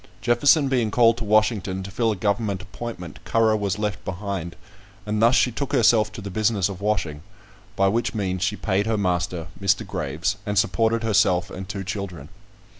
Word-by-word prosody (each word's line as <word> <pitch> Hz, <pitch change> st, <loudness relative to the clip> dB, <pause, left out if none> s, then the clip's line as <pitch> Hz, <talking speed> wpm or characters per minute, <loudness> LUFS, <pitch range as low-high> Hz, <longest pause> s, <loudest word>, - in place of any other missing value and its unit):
Jefferson 140 Hz, +5 st, +4 dB
being 125 Hz, -4 st, +1 dB
called 115 Hz, +1 st, +4 dB
to 120 Hz, -, -4 dB
Washington 105 Hz, -3 st, +1 dB
to 100 Hz, -, -8 dB
fill 115 Hz, +3 st, +1 dB
a -, -, -1 dB
government 100 Hz, 0 st, -1 dB
appointment, 95 Hz, -3 st, -8 dB
Currer 110 Hz, -1 st, +2 dB
was 100 Hz, -2 st, -1 dB
left 105 Hz, -2 st, -3 dB
behind, 95 Hz, -2 st, -4 dB, 0.5 s
and 105 Hz, 0 st, -1 dB
thus 115 Hz, +3 st, +5 dB
she 125 Hz, 0 st, +3 dB
took 140 Hz, +4 st, -4 dB
herself 110 Hz, -1 st, +4 dB
to 110 Hz, -, -7 dB
the 100 Hz, 0 st, -7 dB
business 105 Hz, -1 st, +1 dB
of 95 Hz, -1 st, -8 dB
washing, 90 Hz, -8 st, -1 dB, 0.5 s
by 95 Hz, -1 st, +3 dB
which 115 Hz, +4 st, 0 dB
means 95 Hz, -3 st, -2 dB
she 100 Hz, +2 st, 0 dB
paid 100 Hz, 0 st, -1 dB
her 110 Hz, -1 st, +1 dB
master, 90 Hz, -3 st, -1 dB, 0.2 s
Mr. -, -, +2 dB
Graves, 80 Hz, +8 st, -2 dB
and 105 Hz, -1 st, -3 dB
supported 110 Hz, +5 st, +2 dB
herself 95 Hz, -5 st, +2 dB
and 95 Hz, 0 st, -7 dB
two 100 Hz, -2 st, -4 dB
children. 90 Hz, -6 st, -6 dB
105 Hz, 185 wpm, -23 LUFS, 95-110 Hz, 0.5 s, thus